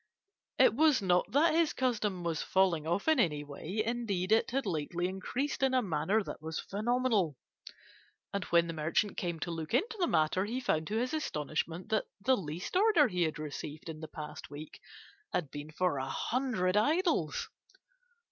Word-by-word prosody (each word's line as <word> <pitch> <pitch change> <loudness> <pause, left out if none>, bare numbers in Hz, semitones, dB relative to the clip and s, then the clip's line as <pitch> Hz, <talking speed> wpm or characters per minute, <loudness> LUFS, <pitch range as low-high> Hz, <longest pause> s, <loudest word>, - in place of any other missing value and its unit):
It - - +6
was 300 +2 +4
not 180 -1 +2
that 310 +5 +4
his 330 -1 +3
custom 210 -8 -1
was 165 -3 -1
falling 175 -5 +2
off 175 - -1
in 315 -3 +4
any 150 -9 +2
way; 160 +9 -4
indeed, 220 -6 -1
it 225 - +4
had 270 +1 -1
lately 175 0 -1
increased 245 +11 -3
in 265 -1 +3
a 255 - +3
manner 190 +4 +1
that - - -7
was 160 0 -4
phenomenal, 215 - 0 1.0
and 200 -1 -1
when 170 -1 +4
the 165 - -4
merchant 165 +6 0
came 170 -2 -3
to 170 - -2
look 165 +4 -3
into 430 - 0
the 350 - +2
matter, 160 - +2
he 235 +5 -2
found 160 -11 0
to 215 - -1
his 250 +4 -1
astonishment 165 - -2
that 220 -1 +1
the 255 +6 +3
least 175 - -5
order 375 -7 +5
he 180 -3 -2
had 160 -2 +1
received 150 +1 -6
in 155 -1 -6
the 160 - -7
past 150 -1 -8
week 150 +2 -9 0.5
had 165 -7 -1
been 145 +1 -7
for 165 -3 0
a 130 - -3
hundred 225 -8 0
idols. 290 - +1
185 Hz, 180 wpm, -32 LUFS, 160-245 Hz, 1.0 s, It